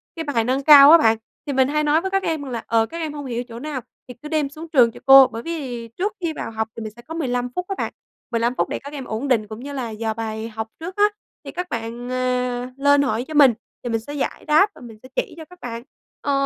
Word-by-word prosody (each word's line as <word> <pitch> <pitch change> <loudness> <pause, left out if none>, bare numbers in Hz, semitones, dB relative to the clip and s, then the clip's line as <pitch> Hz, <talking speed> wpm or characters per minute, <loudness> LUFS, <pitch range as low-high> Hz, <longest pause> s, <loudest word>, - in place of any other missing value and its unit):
cái 325 - -4
bài 240 -6 +1
nâng 260 +4 0
cao 285 0 +10
á 335 - +10
bạn, 225 -6 +3 0.3
thì 285 - -3
mình 260 -1 +3
hay 300 +2 0
nói 300 +2 +3
với 380 +1 -3
các 390 0 +1
em 315 -3 -1
là, 245 -5 -5
ờ, 225 -1 +3
các 335 - -8
em 315 -3 -3
hông 290 -1 -6
hiểu 240 -1 -3
chỗ 230 0 -9
nào 290 -2 -4 0.3
thì 250 - -8
cứ 300 - -7
đem 300 -3 0
xuống 310 +3 -9
trường 250 -7 +5
cho - - -13
cô. 270 -1 +9
Bởi 230 - -7
vì 255 -7 -5
trước 370 - -3
khi 330 -2 -1
vào 225 - -5
học 220 0 -2
thì 230 - -7
mình 215 - -6
sẽ 240 - -13
có 315 - -9
15 250 -6 -1
phút 360 - -2
á 390 - -3
bạn, - - -3 0.4
15 235 +1 0
phút - - 0
để - - -3
các 285 +1 -10
em 275 -3 -6
ổn 225 +5 -3
định 225 -5 +2
cũng 215 +1 -8
như 285 +2 -7
là 255 -4 -3
dò 220 0 -3
bài 220 0 -4
học 220 0 -5
trước 350 +3 -6
á, 410 - +3 0.4
thì - - -6
các 360 0 -5
bạn, 235 +2 -5
à, 250 0 -1
lên 285 +1 +4
hỏi 245 -3 -1
cho 315 - -7
mình 285 -5 +7 0.3
thì 245 - -3
mình 225 -1 0
sẽ 285 +6 -9
giải 285 - -3
đáp 315 +7 +5
và - - -15
mình 230 -3 -11
sẽ 255 - -12
chỉ - - -1
cho 320 - -9
các 360 +2 -17
bạn. 235 -1 -6 0.4
Ờ, 285 - -1
260 Hz, 285 wpm, -22 LUFS, 230-300 Hz, 0.4 s, cao